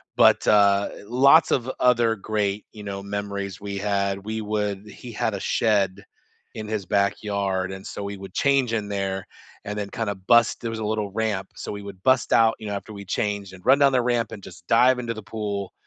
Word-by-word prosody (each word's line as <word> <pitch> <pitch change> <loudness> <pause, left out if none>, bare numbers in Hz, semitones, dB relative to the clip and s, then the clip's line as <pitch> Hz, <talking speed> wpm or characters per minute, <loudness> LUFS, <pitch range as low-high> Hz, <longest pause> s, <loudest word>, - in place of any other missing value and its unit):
but, - - +5
uh, 100 -1 +4 0.2
lots 140 +8 +5
of 125 0 +1
other 120 -2 +4
great, 105 -1 -2
you 105 -2 -11
know, 100 -1 -5
memories 100 -1 -4
we 100 -1 -5
had, 100 -1 -1
we 110 +1 -3
would 105 -1 -2
he 120 +4 -10
had 115 0 -1
a 100 - -3
shed 100 -2 +1 0.5
in 110 -1 -6
his 110 -3 -2
backyard, 100 -1 0
and 95 +1 -9
so 105 - -6
we 100 0 -4
would 95 0 -10
change 140 -4 +2
in 105 -2 -1
there, 95 -2 -3 0.4
and 105 +1 -4
then 100 -1 -3
kinda 105 -2 -3
bust 120 -1 +4
there 115 - -3
was 115 0 -5
a 110 - -3
little 105 -1 -2
ramp, 105 -3 -2
so - - -6
we 100 - -6
would 100 -2 -10
bust 130 -1 +3
out, 115 -1 +5
you 110 - -7
know, 100 - -3
after 100 +2 -7
we 100 -1 -8
changed, 100 0 -2
and 95 0 -14
run 135 +2 +6
down 140 -1 +5
the 125 -2 +3
ramp, 120 -2 0
and 105 - -8
just 85 -1 -12
dive 125 +3 +5
into 120 -1 -3
the 110 -1 -9
pool, 100 -2 -4
105 Hz, 215 wpm, -24 LUFS, 100-115 Hz, 0.5 s, run